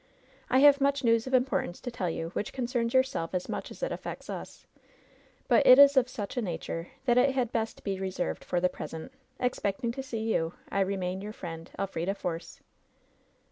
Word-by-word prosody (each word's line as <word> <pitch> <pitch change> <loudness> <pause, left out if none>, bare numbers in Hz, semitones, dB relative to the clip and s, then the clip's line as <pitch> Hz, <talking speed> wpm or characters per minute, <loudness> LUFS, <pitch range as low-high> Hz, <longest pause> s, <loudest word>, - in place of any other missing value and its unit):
I 260 - +4
have 285 0 +7
much 280 0 +2
news 230 0 +3
of 260 - -5
importance 250 -8 0
to 245 - -5
tell 185 -6 -2
you, 165 0 -3
which 200 - -4
concerns 240 -2 -1
yourself 260 -10 +1
as 180 - -2
much - - -4
as - - -9
it - - -1
affects - - -6
us; - - -8 0.8
but - - +5
it 255 - +10
is 280 0 +8
of 255 -2 +4
such 210 -2 -6
a - - +2
nature 165 -3 -4 0.2
that 245 -1 +4
it 265 +1 +3
had 245 -3 0
best 225 -1 -2
be 195 -2 -2
reserved 185 - -3
for 180 - 0
the 180 - +3
present. 160 +3 -7 0.3
Expecting 235 -2 -1
to 270 - -5
see 240 -4 -5
you, 165 +1 -1
I 200 - -1
remain 190 -1 -1
your 210 +1 -6
friend, 165 -4 -7
" - - -16
^LFBIDA 195 0 -2
FOEOB.' 170 -3 -5
220 Hz, 200 wpm, -29 LUFS, 180-255 Hz, 0.8 s, it